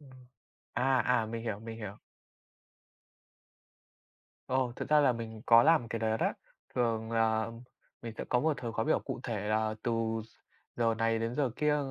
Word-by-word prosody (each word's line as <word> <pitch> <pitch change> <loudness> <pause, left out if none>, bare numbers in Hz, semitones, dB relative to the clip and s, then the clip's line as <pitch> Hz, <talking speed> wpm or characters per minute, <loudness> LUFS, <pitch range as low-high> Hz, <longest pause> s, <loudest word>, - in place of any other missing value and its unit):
Ờ. 145 - -16 0.7
À, 130 +2 +2
à, 120 -3 +2
mình 115 +1 -5
hiểu, 110 -4 -3
mình 115 0 -7
hiểu. 105 -2 -6 2.5
Ồ, 130 -1 0
thực - - -5
ra 150 0 +6
là 135 -3 +4
mình 110 -2 -7
có 115 0 +8
làm 150 -5 +4
cái 115 - -2
đó 110 0 +1
đó, - - +1 0.4
thường 115 -2 0
là 110 0 +2 0.5
mình 115 -1 -5
sẽ - - -3
có 125 - +3
một 155 +2 +2
thời 120 -3 -5
khóa 110 - -1
biểu 155 - +3
cụ 135 -3 -5
thể 105 -5 -3
là 110 0 +1
từ 120 - 0 0.3
gi 115 - -20 0.5
giờ 115 -1 +2
này 115 0 +1
đến 115 +2 -2
giờ 140 -4 +1
kia 150 0 +2
115 Hz, 180 wpm, -31 LUFS, 110-125 Hz, 2.5 s, có